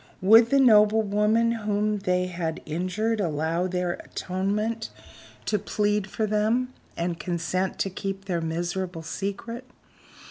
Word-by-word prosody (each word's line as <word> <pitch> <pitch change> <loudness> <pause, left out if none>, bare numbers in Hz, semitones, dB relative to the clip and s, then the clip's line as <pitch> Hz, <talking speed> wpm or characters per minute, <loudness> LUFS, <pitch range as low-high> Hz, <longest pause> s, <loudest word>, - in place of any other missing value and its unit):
Would 225 +5 +7
the 275 - +4
noble 220 -3 +6
woman 210 +3 +2
whom 210 -2 0
they 180 -1 +1
had 170 -3 -4
injured 185 +8 -1
allow 165 +1 0
their 180 -1 -2
atonement 210 +5 -2 0.6
to 210 - +1
plead 210 0 0
for 220 - -1
them, 220 +5 +1 0.2
and 170 0 -2
consent 175 +3 -2
to 195 - 0
keep 195 +1 -5
their 175 -4 -1
miserable 170 +1 -3
secret? 205 +8 -5
195 Hz, 130 wpm, -26 LUFS, 180-215 Hz, 0.6 s, Would